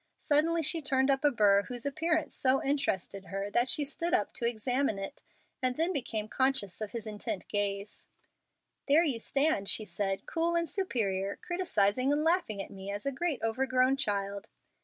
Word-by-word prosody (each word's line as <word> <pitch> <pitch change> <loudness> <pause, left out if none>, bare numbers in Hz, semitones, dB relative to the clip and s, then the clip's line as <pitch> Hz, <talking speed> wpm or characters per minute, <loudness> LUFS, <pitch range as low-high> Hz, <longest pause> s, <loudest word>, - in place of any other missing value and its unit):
Suddenly 325 +3 +2
she 325 +3 +4
turned 270 -1 +2
up 270 +1 0
a 295 - +6
burr 205 -6 +4
whose 245 0 -5
appearance 315 +3 0
so 265 0 +2
interested 195 -9 -1
her 195 +1 -4
that 240 +4 +2
she 300 - +3
stood 335 +4 -1
up 205 - -1
to 235 - -1
examine 245 0 0
it, 195 +8 -7 0.4
and 255 -1 +1
then 335 +4 +1
became 225 -7 -2
conscious 260 -6 0
of 215 - -4
his 230 -2 -5
intent 210 -3 -4
gaze. 205 0 -2 0.8
"There 300 +4 +5
you 270 -8 +1
stand," 275 -5 +1
she 215 - +1
said, 195 -2 -2
"cool 335 +1 0
and 335 0 +1
superior, 200 - -1
criticising 260 - +1
and 295 +1 +1
laughing 325 - +1
at - - -13
me 195 0 -8
as 205 +3 -5
a 275 - +1
great 300 -1 -2
overgrown 255 +3 +2
child." 200 -5 -2
255 Hz, 180 wpm, -30 LUFS, 205-295 Hz, 0.8 s, a